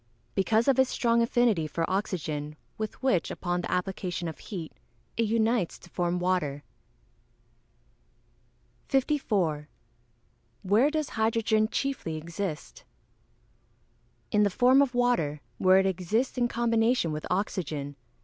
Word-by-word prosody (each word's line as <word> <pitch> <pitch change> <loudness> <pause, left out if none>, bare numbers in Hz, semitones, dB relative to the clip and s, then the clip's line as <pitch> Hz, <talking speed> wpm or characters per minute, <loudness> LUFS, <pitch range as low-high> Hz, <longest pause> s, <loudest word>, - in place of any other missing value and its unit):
_ - - -39 0.3
Because 220 +5 +2
of 270 -1 +4
its 260 -1 +4
strong 235 -1 +2
affinity 230 -8 +2
for 165 +2 -2
oxygen, 155 -6 -2 0.2
with 215 +3 -6
which, 225 -11 +2
upon 175 -1 -2
the - - -5
application 180 -1 -2
of 160 - -7
heat, 175 -7 -6 0.4
it 230 -1 +1
unites 225 -3 +1
to 175 - -17
form 175 0 0
water. 175 -6 -1 2.2
54. 205 - 0 0.9
Where 210 +9 +4
does 310 -1 -2
hydrogen 220 -1 +1
chiefly 255 -15 -2
exist? 170 - -5 1.5
In 210 - +3
the 205 - +4
form 255 +6 +5
of 265 -3 +1
water, 240 -13 +1 0.2
where 185 0 +6
it 190 - +3
exists 195 +8 0
in 245 -1 +2
combination 230 -5 +1
with 155 0 -4
oxygen. 155 -7 -2
200 Hz, 125 wpm, -28 LUFS, 170-235 Hz, 2.2 s, where